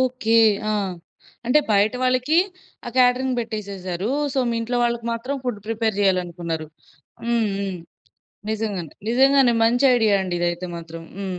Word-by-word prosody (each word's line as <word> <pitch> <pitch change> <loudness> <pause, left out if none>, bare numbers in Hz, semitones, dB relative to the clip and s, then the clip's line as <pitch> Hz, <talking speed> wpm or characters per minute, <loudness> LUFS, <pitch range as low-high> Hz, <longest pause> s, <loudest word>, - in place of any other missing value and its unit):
Okay. 250 -3 +1 0.3
ఆ! - - +1 0.7
అంటే 250 +5 +5
బయట 205 +2 +3
వాళ్ళకి 255 +5 +2 0.5
ఆ - - -3
కేటరింగ్ 255 0 +3
బెట్టేసేసారు. 200 -4 -4 0.3
సో, - - 0
మీ - - -1
ఇంట్లో 245 +2 -1
వాళ్ళకి 235 -1 -1
మాత్రం 255 +5 -3
ఫుడ్ 240 -5 -3
ప్రిపేర్ 225 -1 -1
జేయాలనుకున్నారు. 175 -4 -1 0.6
హ్మ్. 235 -1 +1
హ్మ్. 195 -3 -3 0.7
నిజంగానే. 205 -7 -3 0.2
నిజంగానే. 265 0 +4
మంచి 245 +4 +3
ఐడియా 220 -4 +3
అండి 180 -2 -3
ఇదైతే 175 +1 -1
మాత్రం. 165 0 -9 0.2
హ్మ్. 190 -2 -4
220 Hz, 135 wpm, -22 LUFS, 185-245 Hz, 0.7 s, అంటే